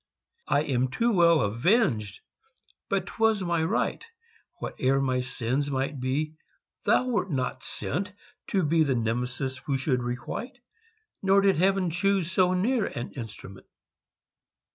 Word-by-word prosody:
I 145 - +2
am 130 -3 +1
too 230 - +1
well 170 -5 +5
avenged! 115 - +1 0.7
but - - 0
'twas 225 -3 +1
my 170 -2 +1
right; 190 +8 0 0.6
Whate'er 135 +1 0
my 130 -2 +1
sins 130 +3 -2
might 135 +1 -2
be, 140 +5 -1 0.5
thou - - +4
wert 235 -5 0
not 130 -5 -2
sent 160 - -3 0.4
To 190 -2 +1
be 160 +2 +3
the 140 -4 +2
Nemesis 125 +3 -2
who 135 +1 -1
should 130 -1 0
requite 125 - -5 0.6
Nor 195 0 +4
did 195 -3 +3
Heaven 190 0 +2
choose 185 0 +1
so 185 -1 +3
near 220 +4 +1
an 120 - -5
instrument. 105 -6 -9
145 Hz, 135 wpm, -27 LUFS, 125-190 Hz, 0.7 s, well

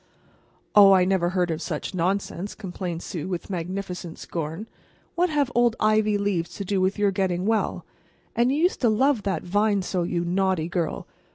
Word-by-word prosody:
"Oh, 200 -1 +8
I 185 -1 +5
never 185 -2 +1
heard 180 -2 0
of 160 0 -3
such 160 +1 -4
nonsense," 190 +2 -2
complained 180 -4 -5
Sue, 170 -5 -5
with 185 +1 -4
magnificent 180 -1 -5
scorn. 165 +5 -5 0.5
"What 355 +1 +1
have 290 -4 +1
old 240 -1 +3
ivy 215 -1 +3
leaves 180 -4 -1
to 200 - -5
do 195 0 0
with 190 +3 +1
your 205 -1 +2
getting 185 -2 -1
well? 220 0 0 0.5
And 240 +2 +3
you 280 - 0
used 350 +4 +1
to 240 - +4
love 255 +2 +2
that 195 -1 -2
vine 205 +2 +1
so, 180 0 -1
you 170 0 -1
naughty 185 -2 +1
girl. 170 -2 -2
190 Hz, 180 wpm, -25 LUFS, 175-210 Hz, 0.5 s, Oh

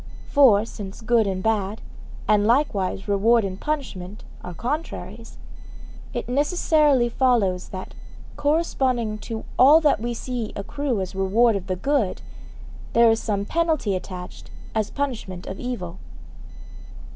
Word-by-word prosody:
For 230 -8 +6
since 200 -4 -8
good 230 -2 +2
and 185 -1 -2
bad, 215 -1 0 0.5
and 210 -1 +3
likewise 215 -7 +1
reward 215 +3 +3
and 190 0 -5
punishment, 220 -10 -4 0.2
are 180 -1 -7
contraries, 295 - -5 0.7
it - - -4
necessarily 290 -1 +3
follows 230 -7 +1
that, 185 -1 -7 0.4
corresponding 260 -8 0
to 220 0 -6
all 285 +5 +8
that 295 -8 +3
we 235 +1 -3
see 240 -2 -4
accrue 250 +2 -2
as 185 0 -5
reward 205 +4 +3
of 190 -1 -4
the 185 - -1
good, 255 -1 0 0.7
there 235 -1 +6
is 225 - +1
some 200 -2 -1
penalty 315 - 0
attached 180 -1 -8 0.2
as 220 -2 0
punishment 225 -10 -4
of 190 - -6
evil. 190 -8 -5
225 Hz, 130 wpm, -23 LUFS, 195-265 Hz, 0.7 s, all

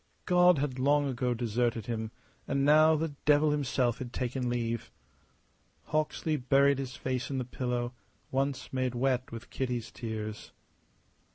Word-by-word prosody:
God 180 -1 +5
had 135 -2 -2
long 145 +2 +3
ago 125 -2 -1
deserted 115 -1 -1
him, 110 -2 -3 0.4
and 140 0 +1
now 155 +2 +6
the 160 +1 -1 0.2
devil 150 +1 +5
himself 130 -4 0
had 125 -2 -6
taken 125 0 -2
leave. 115 -1 -2 1.0
Hawksley 155 0 0
buried 140 +1 +3
his 130 -1 -5
face 130 -1 -3
in 135 - -2
the 130 - -2
pillow 125 0 -2 0.4
once 135 0 -1
made 130 -1 -1
wet 130 0 0
with 115 0 -9
Kitty's 125 -3 -3
tears. 110 -2 -6
130 Hz, 145 wpm, -30 LUFS, 120-140 Hz, 1.0 s, now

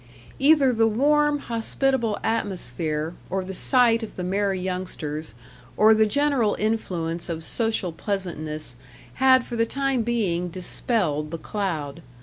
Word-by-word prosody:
Either 275 -2 +5
the 225 -1 +3
warm, 295 +6 +3
hospitable 235 -2 -1
atmosphere, 165 - -2 0.2
or 190 -1 -2
the 190 - -6
sight 235 +2 +3
of 225 - -7
the 180 - -4
merry 195 +1 0
youngsters, 170 -7 -4 0.4
or 215 +1 +7
the 220 0 +4
general 275 -4 +2
influence 175 -7 -2
of 165 -1 -4
social 220 -3 -1
pleasantness, 160 - -4 0.5
had 260 -1 +6
for 240 - -6
the 230 - +2
time 270 +1 0
being 200 -7 0
dispelled 175 - -1
the 165 - -4
cloud. 165 -6 -3
205 Hz, 135 wpm, -24 LUFS, 170-235 Hz, 0.5 s, or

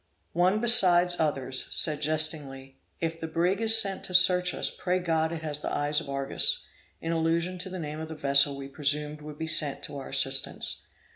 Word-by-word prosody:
One, 185 +5 +1
besides 180 -7 +4
others, 135 -4 0
said 150 -2 +4
jestingly, 150 -4 -1 0.2
'If 165 0 -5
the 160 - -5
brig 175 +5 -2
is 225 0 +6
sent 195 -3 -3
to 180 - -4
search 180 -1 +3
for - - -6
us, - - +1
pray 180 0 -3
God 165 -3 -2
it 165 -1 -7
has 150 -2 -4
the - - -6
eyes 145 +1 -1
of 150 - -11
Argus,' 140 - +1 0.4
in 165 - -5
allusion 165 +2 -2
to 185 - -7
the 185 - -8
name 155 -2 -7
of 160 0 -8
the 160 - -8
vessel 140 -1 +3
we 135 0 -9
presumed 150 +1 -1
would 150 0 -11
be 160 - -5
sent 155 -3 0
to 140 - -7
our 135 - -10
assistance. - - -1
160 Hz, 205 wpm, -26 LUFS, 145-180 Hz, 0.4 s, is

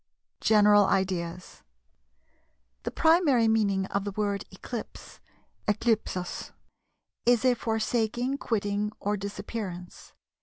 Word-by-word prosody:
GENERAL 210 -1 +5
IDEAS. 180 -2 -2 1.2
The - - -3
primary 320 -8 +4
meaning 200 -4 +2
of 200 - 0
the 205 - -3
word 200 0 -2
"Eclipse" 220 +4 -8 0.5
(ἔϰλειψις) 210 -4 -1 0.7
is 245 0 +4
a 255 - +5
forsaking, 235 +3 -1
quitting, 205 -1 -1
or 205 +1 -1
disappearance. 200 -2 -6
210 Hz, 90 wpm, -28 LUFS, 195-230 Hz, 1.2 s, GENERAL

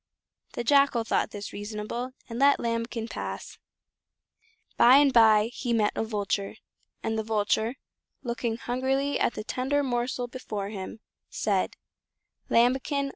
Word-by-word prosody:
The - - -3
Jackal 275 -2 +4
thought - - 0
this 205 -1 -7
reasonable, 215 +4 -5
and 235 -1 -6
let 280 +1 +5
Lambikin 230 0 -2
pass. - - -6 1.2
By 250 +3 +7
and 280 -2 +5
by 220 -1 +5
he 245 -3 -2
met 215 -2 +2
a - - 0
Vulture, 205 -2 -2 0.5
and 220 0 -1
the - - -1
Vulture, 220 +2 0 0.5
looking 235 -2 -2
hungrily 265 +4 -1
at - - +1
the 215 - -4
tender 270 +5 0
morsel 245 -1 -1
before 215 -5 -5
him, 205 +1 -7 0.3
said: - - -1 0.7
"Lambikin! 265 +4 +2
235 Hz, 130 wpm, -27 LUFS, 220-255 Hz, 1.2 s, By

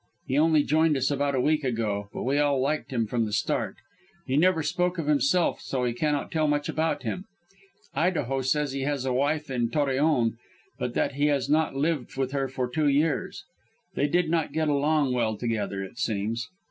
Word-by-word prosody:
He 130 - -2
only 155 -1 +4
joined 155 0 +3
us 135 +2 +1
about 140 0 0
a - - +1
week 150 +3 +2
ago, 110 -5 -2
but - - -5
we 140 +3 +1
all 145 -2 +2
liked 145 +3 -1
him 115 -3 0
from 115 +1 0
the 105 - -5
start. - - -1 0.5
He 130 - -1
never 165 +1 +3
spoke 180 +4 0
of 165 - -2
himself, 150 +4 +2
so 130 -2 -2
we 120 -1 0
cannot 145 +3 -1
tell 155 -1 +1
much 145 0 0
about 160 +1 -1
him. 185 - -4 0.7
Idaho 145 -6 0
says 145 +2 0
he 135 0 -3
has 140 -1 -1
a 130 - 0
wife 145 +2 0
in 120 -2 0
Torreon, 135 -5 +1 0.4
but 125 -1 -3
that - - +1
he 145 +2 +1
has 140 -1 0
not 155 -2 +2
lived 140 -3 -1
with 135 -1 -1
her 135 -1 -1
for 130 -1 -2
two 150 +5 0
years; 145 +2 0 0.5
they 145 - +1
did 175 +3 +2
not 160 -3 0
get 155 0 +1
along 145 -1 +2
well 115 -3 0
together, 105 -4 -2
it 95 - -10
seems. 110 +2 -1
140 Hz, 200 wpm, -26 LUFS, 125-155 Hz, 0.7 s, only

